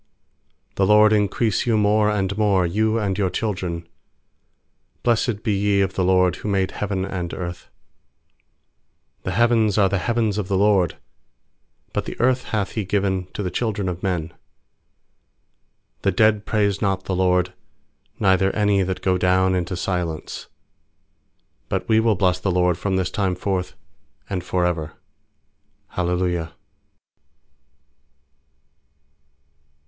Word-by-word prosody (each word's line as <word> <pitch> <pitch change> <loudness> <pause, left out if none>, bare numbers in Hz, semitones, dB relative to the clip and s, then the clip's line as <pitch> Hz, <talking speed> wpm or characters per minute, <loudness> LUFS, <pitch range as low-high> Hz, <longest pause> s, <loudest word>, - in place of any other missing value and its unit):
I4The 95 - +3
LORD 105 +1 +6
increase 105 +2 +1
you 115 -2 +3
more 105 0 +3
and 100 -2 -1
more, 100 -4 +2
You 110 +6 +1
and 100 -4 -1
your 95 -2 +2
children. 90 -6 -3 1.2
lfiBIessed 115 -2 +1
be 110 -4 +1
ye 100 0 +2
of 95 -1 0
the 95 - 0
LORD, 90 -1 +3
Who - - -7
made 95 -1 +1
heaven 95 -2 -2
and 90 -3 -4
earth. 85 -1 -6 1.6
16The 95 - -1
heavens 115 -1 +3
are 100 -2 +4
the 100 - 0
heavens 110 -2 0
of 100 - -3
the 95 - 0
LORD: 95 -4 +2 1.0
But - - -2
the - - -7
earth 125 +1 +2
hath 105 -4 -2
He 110 - -2
given 95 -2 -1
to 105 - -4
th< 90 -2 -4
children 105 -4 -1
of 90 -1 -4
men. 90 -4 -1 1.7
17The 100 -2 0
dead 110 -1 +3
praise 100 -3 +1
not 95 -3 0
the 95 - -2
LORD, 90 -1 +2 0.7
Neither 95 -2 +3
any 105 -2 +2
that 95 0 -3
go 90 -1 +2
down 95 +1 +3
intc 90 0 -2
silence; 90 -4 -3 1.2
18But - - -2
we 110 0 +4
will 110 -1 +3
bless 90 -1 +1
the 95 - -1
LORD 90 -1 +2
From 95 +3 -2
this 95 -1 -1
time 95 -3 0
forth 90 0 -3 0.5
and 95 -3 -3
for 90 0 0
ever. 80 -3 -2 1.0
Hallelujah. 90 -2 -1
95 Hz, 135 wpm, -22 LUFS, 90-105 Hz, 1.7 s, LORD